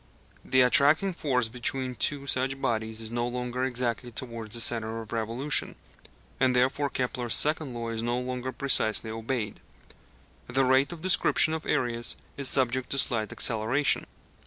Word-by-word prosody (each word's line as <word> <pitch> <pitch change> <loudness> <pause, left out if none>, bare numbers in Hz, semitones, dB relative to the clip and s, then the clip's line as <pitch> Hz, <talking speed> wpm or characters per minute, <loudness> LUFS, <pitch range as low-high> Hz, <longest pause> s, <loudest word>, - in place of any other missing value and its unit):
The 130 - +3
attracting 145 +9 +4
force 130 -8 0
between 125 +2 -2
two 140 +2 -1
such 135 0 -1
bodies 110 -2 -2
is 110 0 -3
no 120 0 -1
longer 125 +1 -3
exactly 125 -1 -2
towards 115 -2 -5
the - - -1
centre 115 -1 -1
of 110 0 -9
revolution, 115 +5 0 0.6
and 130 -1 +2
therefore 135 +3 +1
Kepler's 125 -2 -1
second 150 -4 +1
law 115 -1 -4
is 115 -1 -3
no 120 +1 -1
longer 125 0 -4
precisely 110 -5 +1
obeyed: 115 0 -4 0.9
the 135 +1 +1
rate 130 +3 +3
of 170 -2 -8
description 175 -3 +3
of 160 0 -5
areas 120 -1 0 0.2
is 140 -2 +3
subject 130 -1 +1
to 140 - -1
slight 115 -6 +2
acceleration. 115 +6 +1
125 Hz, 155 wpm, -27 LUFS, 115-135 Hz, 0.9 s, attracting